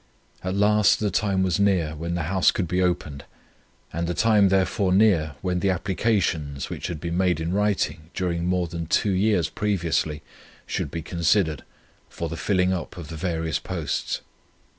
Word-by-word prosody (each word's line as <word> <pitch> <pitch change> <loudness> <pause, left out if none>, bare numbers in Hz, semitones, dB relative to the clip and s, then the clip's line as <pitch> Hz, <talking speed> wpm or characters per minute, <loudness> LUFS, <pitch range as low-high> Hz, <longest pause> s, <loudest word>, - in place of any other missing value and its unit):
"At 95 +1 -2
last 105 +1 +4
the 105 -2 0
time 95 -1 +1
was 95 0 +1
near 90 -6 +2
when 85 +3 -3
the 85 - -1
house 95 +3 +3
could 90 - -1
be 90 +3 0
opened, 75 -6 -1 0.7
and 85 +1 -2
the 85 - -2
time 105 -2 +4
therefore 95 +1 +1
near 90 -7 +3
when 90 -1 0
the 100 - +1
applications, 90 - -1
which - - -4
had 85 -3 -5
been 85 +1 -3
made 90 -3 +2
in 80 +2 -2
writing 95 -6 0
during 85 -2 -1
more 90 -1 +1
than 85 -1 -5
two 100 - +2
years 95 -3 +2
previously, 85 -6 -1 0.4
should - - -3
be 85 -1 -5
considered, 85 -2 +1 0.5
for 85 - -5
the 80 - -4
filling 90 +1 +1
up 90 0 -5
of 80 -4 -8
the 80 - -6
various 80 -1 -2
posts. 85 -6 -3
90 Hz, 175 wpm, -24 LUFS, 80-95 Hz, 0.7 s, last